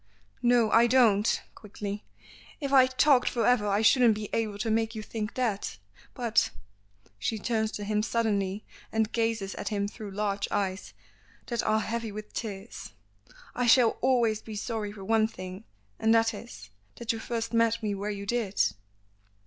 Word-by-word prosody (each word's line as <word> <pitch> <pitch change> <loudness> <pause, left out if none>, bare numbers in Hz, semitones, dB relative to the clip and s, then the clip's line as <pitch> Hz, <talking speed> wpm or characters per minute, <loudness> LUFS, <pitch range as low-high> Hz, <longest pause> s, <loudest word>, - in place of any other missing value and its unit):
"No, 240 -3 +3
I 235 +1 +6
don't," 230 -4 +3
quickly. 205 0 -6 0.6
"If 280 -2 -3
I 260 -1 +7
talked 260 0 +4
for 235 - 0
ever 245 -4 +3
I 205 +2 +1
shouldn't 235 -1 +5
be 210 -1 -6
able 215 -3 -1
to 220 +2 -1
make 225 +1 0
you 215 - -5
think 215 0 -5
that. 230 -6 -2 0.4
But 235 -3 +2 0.3
" - - -38 0.3
She 220 - -1
turns 220 0 -1
to 205 - -5
him 210 +1 0
suddenly, 210 -3 -1 0.3
and 220 -1 0
gazes 225 -4 -1
at - - -6
him 200 -2 -1
through 210 0 -8
large 200 0 -2
eyes 195 -1 -2 0.5
that 235 -2 -1
are 215 0 +1
heavy 230 0 -3
with 210 +1 -8
tears. 200 - -6 0.6
"I 245 0 0
shall 235 -1 +5
always 235 -4 +2
be 220 - -8
sorry 215 -1 -3
for 200 -2 -10
one 220 +1 +3
thing, 185 0 -9 0.3
and 225 +1 +4
that 225 0 +3
is 100 - -10 0.2
that 235 - -2
you 225 - -5
first 230 0 -3
met 230 0 +2
me 210 -1 0
where 200 +1 -3
you 200 -1 -5
did." 215 -2 -2
220 Hz, 175 wpm, -28 LUFS, 205-230 Hz, 0.6 s, I